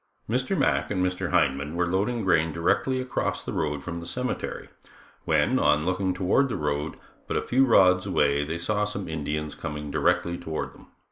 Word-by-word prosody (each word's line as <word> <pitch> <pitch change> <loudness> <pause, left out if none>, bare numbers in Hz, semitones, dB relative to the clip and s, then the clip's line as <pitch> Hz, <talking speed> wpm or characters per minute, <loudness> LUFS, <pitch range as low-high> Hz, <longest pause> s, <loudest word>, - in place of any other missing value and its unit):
Mr. - - 0
Mack - - +1
and 90 -2 0
Mr. 90 0 -2
Hindman 75 -3 +1
were 90 +1 +1
loading 105 +6 0
grain 80 -3 +3
directly 100 - +1
across 130 0 -2
the - - -5
road 75 -2 -2
from 85 -1 -5
the 85 - -8
cemetery, 125 +6 -4 0.6
when, - - +2
on 75 +1 +3
looking 95 +1 0
toward 95 +10 +2
the - - -2
road, 75 +1 -2 0.3
but - - -1
a - - +1
few 135 +2 +3
rods 95 -5 +5
away, 70 -6 +2
they 80 +3 -3
saw 105 +5 0
some 100 -2 -3
Indians 75 -1 -3
coming 75 -3 -6
directly 85 +4 +1
toward 80 -1 -4
them. - - -17
85 Hz, 185 wpm, -26 LUFS, 75-100 Hz, 0.6 s, rods